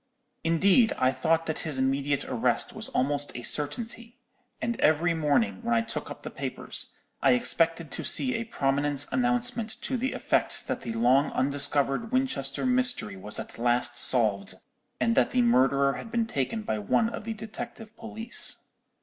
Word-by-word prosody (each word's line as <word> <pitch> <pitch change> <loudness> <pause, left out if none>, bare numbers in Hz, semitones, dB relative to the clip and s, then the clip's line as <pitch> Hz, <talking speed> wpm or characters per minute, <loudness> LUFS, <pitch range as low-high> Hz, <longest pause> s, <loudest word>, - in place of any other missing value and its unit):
"Indeed, 190 +8 +4
I 130 0 +3
thought 165 +3 0
that 160 - -2
his 155 -5 -2
immediate 135 +1 0
arrest 120 -3 0
was - - -3
almost 145 +2 -1
a 120 - -7
certainty; 230 - -2 0.4
and 235 0 -3
every 160 +3 +3
morning, 160 +10 +1
when 235 0 0
I 230 - +3
took 225 - -5
up - - -9
the - - -6
papers, - - -5 0.3
I - - +5
expected 165 - +1
to - - -4
see 260 -1 +2
a 230 -1 -2
prominent 145 -2 +1
announcement 245 -2 -1
to 260 - -1
the 260 +3 -2
effect - - 0
that - - -3
the 115 - -5
long 125 +5 +3
undiscovered 140 - +1
Winchester 255 - 0
mystery 250 - 0
was 95 +2 -3
at - - -8
last 120 0 +1
solved, 105 -6 +1 0.4
and 230 - +2
that - - +3
the 250 0 +2
murderer 140 - +3
had 230 - -8
been 230 0 0
taken 215 - -2
by 110 - -2
one 105 - +1
of 230 - -6
the 225 0 -4
detective 225 +1 -8
police. 225 +1 +1
165 Hz, 165 wpm, -27 LUFS, -, 0.4 s, I